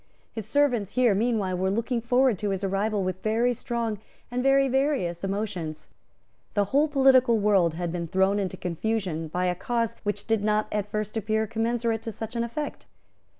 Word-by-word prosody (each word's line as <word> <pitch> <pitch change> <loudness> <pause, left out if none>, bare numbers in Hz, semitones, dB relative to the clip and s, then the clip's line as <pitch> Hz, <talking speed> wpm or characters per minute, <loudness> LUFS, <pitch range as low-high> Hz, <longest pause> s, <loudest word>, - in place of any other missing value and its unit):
His 220 -3 -6
servants 245 -6 +1
here 250 -4 +4
meanwhile 210 -3 0
were 190 +1 0
looking 230 +4 -1
forward 245 -2 +2
to 210 - -1
his 195 0 -2
arrival 200 +1 0
with 185 0 -3
very 230 +3 +2
strong 235 -3 -3 0.3
and 250 +1 -1
very 275 +1 +4
various 265 - 0
emotions. 195 -6 -4 0.6
The 205 - +3
whole 290 +3 +4
political 265 -4 +5
world 195 -6 +3
had 175 0 -3
been 170 -1 -3
thrown 190 +4 +2
into 190 -2 -3
confusion 180 -2 -2
by 180 +4 -1
a 180 - +2
cause 230 +4 -1
which 205 -1 -3
did 220 -2 +1
not 210 0 +1
at 210 -1 -2
first 215 0 -3
appear 220 +1 0
commensurate 230 0 -1
to 225 - -5
such 225 +2 -7
an 235 - 0
effect. 260 +6 -5
215 Hz, 180 wpm, -26 LUFS, 195-235 Hz, 0.6 s, political